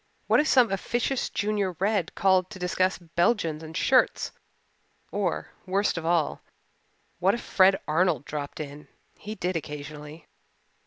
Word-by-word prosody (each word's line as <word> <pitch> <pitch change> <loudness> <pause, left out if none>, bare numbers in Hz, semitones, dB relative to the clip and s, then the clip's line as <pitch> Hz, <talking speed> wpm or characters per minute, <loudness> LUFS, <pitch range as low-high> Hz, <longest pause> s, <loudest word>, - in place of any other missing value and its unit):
What - - +4
if 305 - +2
some 250 -7 +5
officious 240 +6 -1
Junior 205 -2 -1
Red 195 0 -1
called 190 -2 +3
to 215 - -9
discuss 185 +1 0
Belgians 170 -1 0
and 160 0 -7
shirts? 260 -1 +3 0.8
Or, - - -2 0.2
worst 195 +2 +1
of 165 -1 -3
all, 170 -3 +1 0.8
what 190 +4 +3
if 240 - -6
Fred 190 0 +4
Arnold 160 -2 +2
dropped 145 -1 -5
in? 145 0 -7 0.3
He 215 +1 -6
did 180 -1 -2
occasionally. 150 0 -7
185 Hz, 140 wpm, -27 LUFS, 155-200 Hz, 0.8 s, some